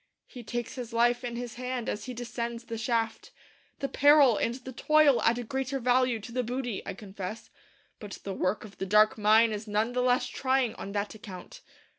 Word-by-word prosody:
He 245 Hz, -, -11 dB
takes 240 Hz, +1 st, -4 dB
his 245 Hz, -3 st, -7 dB
life 240 Hz, +1 st, +2 dB
in 240 Hz, -1 st, -4 dB
his 240 Hz, -1 st, -5 dB
hand 250 Hz, -2 st, -3 dB
as 210 Hz, -, -3 dB
he 255 Hz, -1 st, -6 dB
descends 235 Hz, 0 st, -4 dB
the 230 Hz, -1 st, -6 dB
shaft. 225 Hz, -1 st, -1 dB, 0.5 s
The 275 Hz, -, 0 dB
peril 285 Hz, -4 st, +6 dB
and 230 Hz, +3 st, -1 dB
the 260 Hz, 0 st, -9 dB
toil 300 Hz, 0 st, +4 dB
add 230 Hz, +1 st, +3 dB
a 245 Hz, -, -3 dB
greater 265 Hz, +3 st, -2 dB
value 250 Hz, -1 st, +2 dB
to 235 Hz, -, -9 dB
the 250 Hz, +1 st, 0 dB
booty, 245 Hz, -2 st, -3 dB
I 195 Hz, -, -4 dB
confess; 200 Hz, +1 st, -8 dB, 0.5 s
but 205 Hz, -2 st, -8 dB
the 195 Hz, -, -4 dB
work 185 Hz, +3 st, -1 dB
of 200 Hz, -, -14 dB
the 190 Hz, -, -3 dB
dark 215 Hz, +2 st, +5 dB
mine 220 Hz, +1 st, +4 dB
is 215 Hz, +1 st, -5 dB
none 215 Hz, +3 st, 0 dB
the 250 Hz, -, +1 dB
less 250 Hz, 0 st, +2 dB
trying 260 Hz, -3 st, 0 dB
on 200 Hz, -, -8 dB
that 205 Hz, 0 st, -2 dB
account. 200 Hz, -5 st, -10 dB
235 Hz, 205 wpm, -28 LUFS, 215-250 Hz, 0.5 s, peril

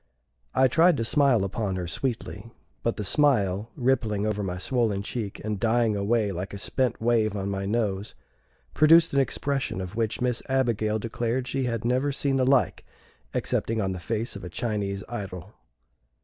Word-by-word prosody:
I 130 Hz, 0 st, +5 dB
tried 165 Hz, +7 st, +4 dB
to 115 Hz, -, -1 dB
smile 135 Hz, -5 st, +3 dB
upon 100 Hz, -1 st, -2 dB
her 90 Hz, -1 st, -3 dB
sweetly, 110 Hz, +1 st, -4 dB, 0.3 s
but 115 Hz, -, 0 dB
the 105 Hz, -, -4 dB
smile, 105 Hz, -6 st, +2 dB
rippling 115 Hz, -5 st, +1 dB
over 105 Hz, -1 st, -1 dB
my 90 Hz, -2 st, -3 dB
swollen 110 Hz, -1 st, 0 dB
cheek, 105 Hz, -2 st, -4 dB
and 105 Hz, -2 st, -2 dB
dying 115 Hz, -1 st, +2 dB
away 105 Hz, +1 st, +1 dB
like 95 Hz, +2 st, -5 dB
a -, -, -5 dB
spent 125 Hz, +4 st, 0 dB
wave 110 Hz, -2 st, +2 dB
on 100 Hz, 0 st, -2 dB
my 95 Hz, 0 st, -3 dB
nose, 105 Hz, -2 st, -1 dB, 0.6 s
produced 165 Hz, +1 st, +6 dB
an 140 Hz, -, +3 dB
expression 135 Hz, -4 st, -1 dB
of 95 Hz, +2 st, -6 dB
which 110 Hz, -2 st, -1 dB
Miss 125 Hz, -1 st, 0 dB
Abigail 115 Hz, -5 st, +1 dB
declared 120 Hz, +3 st, -2 dB
she 135 Hz, -1 st, -1 dB
had 115 Hz, -2 st, -2 dB
never 130 Hz, +4 st, +1 dB
seen 140 Hz, -1 st, 0 dB
the 130 Hz, -, +2 dB
like 135 Hz, -2 st, +2 dB, 0.5 s
excepting 115 Hz, 0 st, 0 dB
on 95 Hz, -3 st, 0 dB
the 95 Hz, -, -4 dB
face 115 Hz, +5 st, -3 dB
of 100 Hz, -, -8 dB
a 90 Hz, -, -6 dB
Chinese 100 Hz, -1 st, -2 dB
idol. 100 Hz, -4 st, -7 dB
115 Hz, 175 wpm, -26 LUFS, 100-125 Hz, 0.6 s, produced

